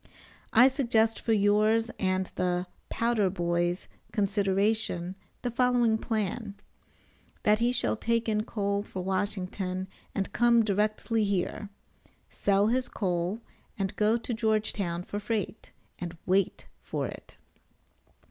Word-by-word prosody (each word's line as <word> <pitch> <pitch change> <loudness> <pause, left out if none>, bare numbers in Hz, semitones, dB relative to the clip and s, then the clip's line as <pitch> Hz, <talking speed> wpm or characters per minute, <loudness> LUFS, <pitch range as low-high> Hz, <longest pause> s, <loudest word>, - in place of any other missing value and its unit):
I 245 +3 +8
suggest 235 -5 +2
for 230 - -1
yours 215 +2 +3
and 185 -1 0
the 180 0 0 0.2
"powder 230 -4 +1
boy's" 175 0 -1 0.2
consideration 200 -2 0 0.3
the 245 - -1
following 240 -2 +3
plan: 215 -1 -2 0.9
that 210 0 +4
he 240 +1 +3
shall 245 -1 +1
take 230 +1 0
in 215 -1 +2
coal 200 -3 -1
for 190 -2 -6
Washington 190 -1 -2 0.3
and 195 0 -2
come 235 -1 +4
directly 215 +2 +1
here 200 +1 -1 0.6
sell 200 0 +2
his 250 +3 +1
coal 180 +2 -1 0.4
and 195 -1 -2
go 215 +2 +3
to 235 +1 -4
Georgetown 215 -6 0
for 205 - -4
freight, 215 0 -3 0.3
and 175 -1 -5
wait 190 0 +1 0.2
for - - -3
it. - - -9
210 Hz, 120 wpm, -29 LUFS, 190-225 Hz, 0.9 s, I